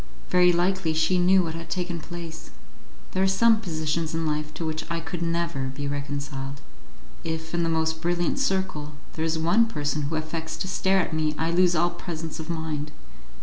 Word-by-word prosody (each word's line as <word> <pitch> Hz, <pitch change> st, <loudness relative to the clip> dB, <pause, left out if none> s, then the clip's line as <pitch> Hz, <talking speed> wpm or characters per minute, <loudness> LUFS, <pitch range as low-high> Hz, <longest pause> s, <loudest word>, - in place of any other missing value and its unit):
Very 180 Hz, 0 st, +6 dB
likely 175 Hz, -1 st, +1 dB
she 160 Hz, +4 st, +3 dB
knew 185 Hz, +1 st, +5 dB
what 165 Hz, -2 st, -3 dB
had 165 Hz, +1 st, -7 dB
taken 175 Hz, -2 st, -2 dB
place. 170 Hz, -1 st, -7 dB, 0.6 s
There 185 Hz, -, 0 dB
are 190 Hz, -, +5 dB
some 220 Hz, +3 st, +5 dB
positions 160 Hz, -3 st, -1 dB
in 165 Hz, 0 st, 0 dB
life 150 Hz, 0 st, -1 dB
to 165 Hz, -, -3 dB
which 155 Hz, 0 st, -2 dB
I 170 Hz, 0 st, -1 dB
could 170 Hz, +1 st, -5 dB
never 165 Hz, -5 st, 0 dB
be 140 Hz, +2 st, -4 dB
reconciled. 140 Hz, -1 st, -4 dB, 0.6 s
If, 160 Hz, 0 st, -4 dB
in 170 Hz, -, +1 dB
the 165 Hz, -, +1 dB
most 160 Hz, 0 st, 0 dB
brilliant 175 Hz, +9 st, +1 dB
circle, 190 Hz, -, 0 dB, 0.2 s
there 160 Hz, -, -2 dB
is 160 Hz, 0 st, +1 dB
one 205 Hz, +9 st, +4 dB
person 150 Hz, -6 st, -1 dB
who 145 Hz, +3 st, -2 dB
affects 160 Hz, +1 st, -3 dB
to -, -, -2 dB
stare 190 Hz, +1 st, +3 dB
at 175 Hz, -, -3 dB
me 155 Hz, -1 st, +1 dB
I 165 Hz, +1 st, +1 dB
lose 175 Hz, 0 st, +4 dB
all 175 Hz, +2 st, +3 dB
presence 165 Hz, -2 st, -5 dB
of 160 Hz, +1 st, -6 dB
mind. 160 Hz, -3 st, -2 dB
165 Hz, 190 wpm, -26 LUFS, 155-175 Hz, 0.6 s, Very